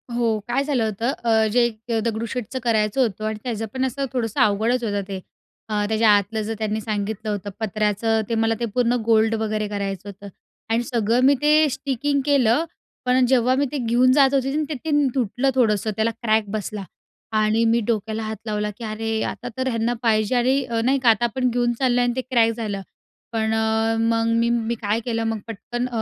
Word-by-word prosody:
हो, 230 -2 +1
काय 255 +3 +1
झालं 275 -5 0
होतं, 220 +4 -1
अ, 220 -2 +3
जे 245 +2 +4
एक 230 0 -6
दगडूशेठचं 230 +2 -3
करायचं 220 +1 +1
होतं 215 -3 -1
आणि 215 0 -3
त्याचं 225 -3 -3
पण 260 0 0
असं 275 +2 -2
थोडंसं 230 -4 -2
अवघडच 220 +4 +2
होतं 205 -3 -1
ते. 195 -2 -5 0.5
अ, 210 -1 0
त्याच्या 220 0 +3
आतलं 215 +2 -2
जर 215 +1 -3
त्यांनी 215 0 -1
सांगितलं 215 0 -3
होतं 205 -1 -3
पत्र्याचं, 215 +1 0
ते 230 - 0
मला 225 0 +2
ते 240 - 0
पूर्ण 245 -1 +2
गोल्ड 225 0 +3
वगैरे 215 -1 -1
करायचं 200 -1 -4
होतं 200 +1 -10 0.4
आणि 230 +2 +1
सगळं 230 -1 0
मी 280 +2 +6
ते 305 +1 +5
स्टिकिंग 280 +1 -1
केलं. 275 -1 +3 0.4
पण 250 0 +3
जेव्हा 250 0 +3
मी 280 +2 +1
ते 295 - -2
घेऊन 245 +1 +3
जात 275 -1 +4
होते 270 -1 +1
आणि 305 +1 0
ते - - -2
तीन 295 -2 +2
तुटलं. 250 +2 0
थोडंसं 220 -4 +2
त्याला 220 +2 +1
क्रॅक 220 -2 0
बसला 210 -1 -4 0.6
आणि 215 +2 +2
मी 230 +1 +3
डोक्याला 220 -1 -1
हात 220 0 -4
लावला 210 -1 -2
की 235 - -9
अरे, 220 0 -2
आता 245 - -5
तर 260 0 -1
यांना 230 -1 0
पाहिजे 215 0 +2
आणि 260 +3 +2
अ, 230 -1 0
नाही 265 +4 +2
का, 240 - +6
आता 225 +1 +3
आपण 250 +2 0
घेऊन 240 0 +1
चाललोय 245 -2 +2
आणि 245 0 +1
ते 260 - -1
क्रॅक 235 -3 +2
झालं. 210 -4 -4 0.5
पण 220 -1 0
अ, 220 0 +1
मग 225 0 +1
मी 235 0 +2
मी 235 0 0
काय 210 +1 0
केलं, 230 -2 -1
मग 225 -1 -1
पटकन 240 +3 -4
225 Hz, 200 wpm, -22 LUFS, 215-245 Hz, 0.6 s, मी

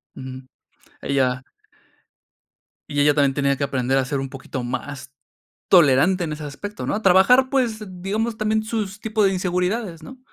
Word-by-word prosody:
Ujú. 130 0 -8 0.6
Ella. 130 -2 0 1.5
Y 145 -1 -2
ella 145 +1 +5
también 140 -2 +3
tenía 140 -1 +1
que - - -2
aprender 130 -1 0
a 130 - +1
ser 140 +1 -2
un 135 0 -4
poquito 130 -1 -6
más 130 +2 -5 0.6
tolerante 170 +2 +5
en 155 - -4
ese 150 0 -6
aspecto, 205 +9 -7
¿no? 210 - -1
Trabajar, 195 +8 +5
pues, 235 -6 0 0.2
digamos, 220 +4 -1
también 215 0 0
sus 210 -3 -4
tipos 215 -2 +1
de 195 - +2
inseguridades, 180 0 -2
¿no? 260 +11 -11
170 Hz, 155 wpm, -22 LUFS, 135-215 Hz, 1.5 s, ella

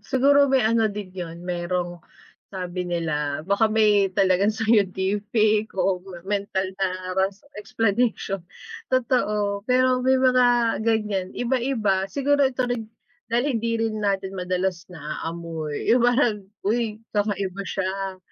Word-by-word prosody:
siguro 280 +1 +4
may 260 -4 +3
ano 225 0 +3
din 205 -3 -7
yun, 175 -1 -7
merong 175 0 -3 0.5
sabi 180 -1 -4
nila 155 -3 -2
baka 200 +3 +3
may 210 -2 +4
talagang 190 +1 +3
scientific 210 0 +1
o 185 -1 +1
ma 185 -2 -10
mental 195 -2 -2
na 185 -1 -2
ras 195 +3 -1
explanation. 210 -2 -1 0.5
Totoo, 210 -5 +1
pero 255 0 +3
may 260 +1 +4
mga 245 -3 +3
ganyan. 210 -4 0
Iba-iba, 235 -6 0
siguro 285 +4 +2
ito 255 -1 -2
rin 235 -3 -3 0.4
dahil 240 +3 +2 0.2
hindi 230 0 -1
rin 220 -1 -1
natin 195 -1 -1
madalas 180 -1 -2
naaamoy 160 -1 -5
yung 240 0 +4
parang, 240 -4 +2 0.2
uy 220 -1 0 0.2
kakaiba 200 -2 -1
siya, 195 0 -3
205 Hz, 125 wpm, -24 LUFS, 185-230 Hz, 0.5 s, siguro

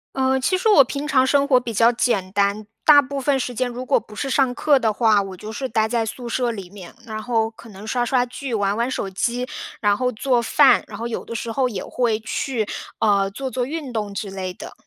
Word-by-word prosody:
呃， 265 0 +2
其 370 +8 +1
实 370 - -1
我 345 -10 +8
平 280 +4 -5
常 260 -3 +3
生 280 +1 +2
活 255 -3 +5
比 240 -2 -6
较 230 +3 +5
简 220 -6 0
单。 200 +1 0 0.2
大 295 -2 +8
部 275 +1 -5
分 270 0 +1
时 250 0 -3
间 250 +1 -1
如 250 +2 -6
果 275 - +3
不 210 - -15
是 270 +4 -3
上 260 +1 +3
课 290 -3 +3
的 225 -3 +1
话， 215 -2 +3
我 190 -2 -7
就 215 +3 -8
是 260 +4 -4
待 220 -1 +1
在 230 0 0
宿 240 +2 -6
舍 245 0 0
里 195 -5 -6
面， 190 -4 -11
然 215 -1 -5
后 225 -2 0
可 230 0 -15
能 200 0 -11
刷 240 +2 0
刷 245 +1 +1
剧， 255 +2 -7
玩 200 -1 0
玩 235 +3 0
手 210 - -3
机， 245 +6 -1 0.3
然 205 -2 +3
后 250 +3 0
做 245 +2 +1
饭， 270 +4 +5
然 205 - -8
后 230 +2 -4
有 235 - -4
的 230 - -7
时 230 0 -4
候 255 +2 +1
也 200 -6 -5
会 230 -3 0
去， 225 -1 -2 0.3
呃， 200 -2 +2
做 265 +6 -5
做 255 -1 -1
运 290 -4 -5
动 210 -2 -3
之 195 -1 -4
类 185 -1 -4
的。 - - -9
235 Hz, 265 characters per minute, -22 LUFS, 215-260 Hz, 0.3 s, 我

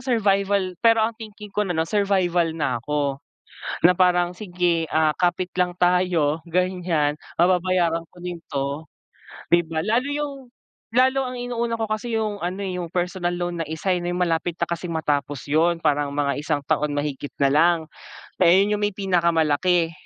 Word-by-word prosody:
survival 200 -6 +1
pero 225 -1 +4
ang 225 - -1
thinking 210 -2 -10
ko 210 -1 -1
na, 175 - -2
'no, 160 - +2
survival 185 -3 +1
na 130 -6 -1
ako, 140 +1 -2 0.7
na 180 - +7
parang, 180 -1 +2
"Sige, 175 -4 -1
ah, 155 -1 +2
kapit 180 +1 -1
lang 180 -1 0
tayo", 175 -4 +2
ganyan, 180 -4 0 0.2
"Mababayaran 175 -1 +2
ko - - -22
din 175 -1 -6
'to", 140 +2 -3 0.6
di 175 0 +4
ba? 160 -1 -4
Lalo 230 - +1
yung, 290 0 -2 0.6
lalo 260 +2 +3
ang 250 - -6
inuuna 235 -1 -2
ko 225 - -1
kasi 215 +2 -3
yung 210 -2 -2
ano, 180 +2 -3
eh, 185 -2 -3
yung 170 - -7
personal 175 0 -1
loan, 175 -1 -3
na - - -9
isa 160 +4 -1
eh, 175 - -3
may 175 - -2
malapit 175 -1 0
na - - 0
kasing 170 0 -4
matapos 145 -3 -2
'yon, 165 +3 +2
parang 145 -3 +1
mga 140 0 0
isang 150 -1 -1
taon 150 0 +1
mahigit 145 -1 -3
na 140 - +4
lang, 170 +4 +4 0.6
eh, 175 - +6 0.2
'yon 210 0 0
yung - - -6
may 205 - -1
pinakamalaki. 170 -2 +2
175 Hz, 175 wpm, -23 LUFS, 160-195 Hz, 0.7 s, na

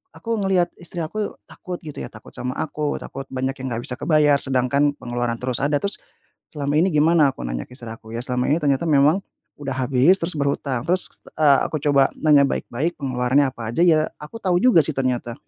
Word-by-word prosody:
aku 230 -1 -3
ngelihat 190 -3 +2
istri 175 0 -7
aku 210 +6 -4
takut 180 -1 -7
gitu 150 -2 -8
ya, - - -5
takut - - -14
sama 125 +1 -4
aku, 150 -1 -2
takut 135 -1 -8
banyak 130 +1 -2
yang 130 - -4
gak 120 - -5
bisa 125 - -3
kebayar, 150 -3 +3
sedangkan 140 +2 +1
pengeluaran 120 -1 -2
terus 125 -1 -1
ada. 145 +1 +2
Terus 200 +4 -2 0.6
selama 145 0 -1
ini 180 +3 +3
gimana 155 -1 +4
aku - - -10
nanya - - -3
istri 125 -2 -10
aku? 110 0 -11
Ya 115 - -3
selama 125 0 -1
ini 155 - +3
ternyata 140 +1 +1
memang 155 +5 +3 0.3
udah 140 -2 -4
habis, 130 +7 +3
terus 165 +1 -1
berhutang. 140 -3 -1
Terus, 180 +2 0 0.3
eee, 145 -3 +6
aku 155 - -3
coba 140 -1 +4
nanya 150 -2 +5
baik-baik 145 +5 -2
pengeluarannya 130 +1 +2
apa 115 -3 -6
aja, - - 0
ya 160 -3 +5 0.2
aku 150 +8 -9
tahu 180 -2 +2
juga 245 -9 +6
sih 155 - -1
ternyata. 125 -3 -1
140 Hz, 200 wpm, -22 LUFS, 130-160 Hz, 0.6 s, eee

